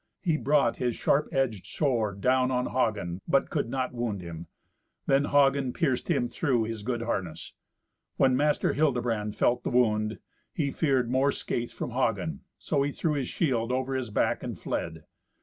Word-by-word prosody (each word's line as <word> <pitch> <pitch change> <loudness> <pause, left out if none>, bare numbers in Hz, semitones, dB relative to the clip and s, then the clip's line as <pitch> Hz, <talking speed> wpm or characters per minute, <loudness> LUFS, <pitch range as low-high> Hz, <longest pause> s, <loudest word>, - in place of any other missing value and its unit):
He 165 -5 +2
brought 150 -1 +2
his 125 -2 -1
sharp 150 +2 +1
edged 120 -8 -1
sword 110 -9 -1
down 130 +1 +3
on 125 -1 0
Hagen, 100 -8 -1
but 180 +2 +2
could 145 -7 -1
not 130 0 -2
wound 120 -4 -2
him. 85 -1 -8 0.6
Then 140 +1 +3
Hagen 140 -3 +3
pierced 140 -8 0
him 120 - +2
through 125 -4 0
his 110 -1 -4
good 120 +1 -2
harness. 95 -8 -4 0.6
When 130 -1 +4
Master 150 +2 +2
Hildebrand 120 -8 0
felt 125 +1 +2
the - - -2
wound, 110 -3 +2 0.4
he 145 -4 0
feared 130 -6 +1
more 135 +2 +3
scathe 120 -3 -3
from - - -5
Hagen, 130 +5 -1 0.2
so 145 -3 0
he 140 +1 0
threw 155 +2 -1
his 140 -3 -2
shield 125 -7 0
over 130 +1 -1
his 130 -3 -2
back 105 - +1
and - - -5
fled. 80 -1 -4
125 Hz, 170 wpm, -28 LUFS, 115-140 Hz, 0.6 s, When